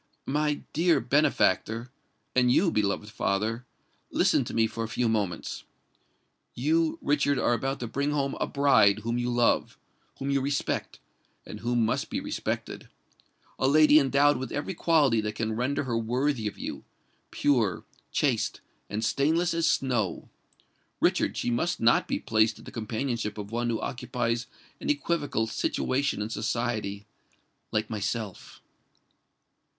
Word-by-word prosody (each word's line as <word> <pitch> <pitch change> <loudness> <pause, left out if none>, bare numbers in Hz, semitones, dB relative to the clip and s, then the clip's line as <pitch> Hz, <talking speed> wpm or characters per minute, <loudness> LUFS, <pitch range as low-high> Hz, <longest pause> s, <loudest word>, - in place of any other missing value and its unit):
"My 150 +1 0
dear 165 -1 +3
benefactor—and 125 -1 0
you, 170 +6 +3
beloved 105 -2 -1
father—listen 110 +6 -1
to - - -6
me 115 - +4
for 115 +1 -4
a - - -3
few 120 +2 0
moments. 105 -5 -2 0.9
You, 160 +5 +1
Richard, 145 -1 +2
are 120 - +2
about 135 +4 -2
to 120 - -3
bring 140 +5 -1
home 140 -2 0
a - - 0
bride 110 -8 +4
whom 115 +1 -1
you 120 0 -1
love—whom 120 +3 -1
you 140 -1 +2
respect—and 140 +1 -5
who 120 +2 -1
must 115 -2 +1
be - - -2
respected,—a 130 - -6
lady 155 +1 +7
endowed 140 0 +3
with 130 - -5
every 145 +6 -3
quality 150 -10 +3
that 105 0 -4
can 110 0 -2
render 130 +5 0
her 125 -3 -2
worthy 120 +1 0
of 105 - -6
you,—pure, 120 -10 -2 0.3
chaste, - - 0 0.3
and 110 +2 -2
stainless 165 +7 +2
as 165 0 +1
snow. 120 -8 0 0.7
Richard, - - +1
she 120 - -1
must 170 +9 0
not 115 0 +4
be - - 0
placed 110 0 +2
in - - -14
the - - -10
companionship 115 -1 -3
of 105 0 -7
one 120 +1 -1
who 115 -2 -1
occupies 120 -1 -2 0.3
an - - -4
equivocal 145 -5 0
situation 130 +1 -1
in 110 - -5
society—like 110 -1 -4
myself!" 105 -1 -4
120 Hz, 135 wpm, -27 LUFS, 110-140 Hz, 0.9 s, lady